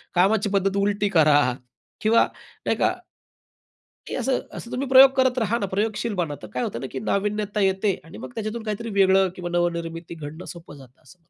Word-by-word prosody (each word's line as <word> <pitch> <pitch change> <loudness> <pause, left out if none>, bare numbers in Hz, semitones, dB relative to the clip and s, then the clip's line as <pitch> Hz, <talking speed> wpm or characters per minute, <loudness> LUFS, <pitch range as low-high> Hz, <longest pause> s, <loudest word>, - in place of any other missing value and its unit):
कामाची 205 +3 +3
पद्धत 195 0 +1
उलटी 205 0 +1
करा, 155 -5 +5 0.6
किंवा 225 +2 +4 0.4
नाही - - +1
का - - +2 1.1
की - - -4
असं, 260 0 0 0.2
असं 235 - -9
तुम्ही 270 +2 -2
प्रयोग 265 +1 +9
करत 260 -1 +2
राहा 225 +1 0
ना, 200 - -1
प्रयोगशील 215 +2 -1
बना, 150 -4 -1
तर 110 - -8
काय 125 - -1
होत - - -4
ना 135 - -4
की - - -4
नाविन्यता 210 +1 -1
येते 195 +1 +2
आणि 165 - -12
मग - - -8
त्याच्यातून 220 +1 -4
काहीतरी 225 +2 -4
वेगळं 190 0 +5
किंवा 175 -1 -5
नवनिर्मिती 170 -1 -2
घडणं 155 +2 -8
सोपं 165 -4 -12
जातं, 130 -2 -17
असं 180 +7 -19
मला 165 - -39
200 Hz, 190 wpm, -24 LUFS, 170-220 Hz, 1.1 s, प्रयोग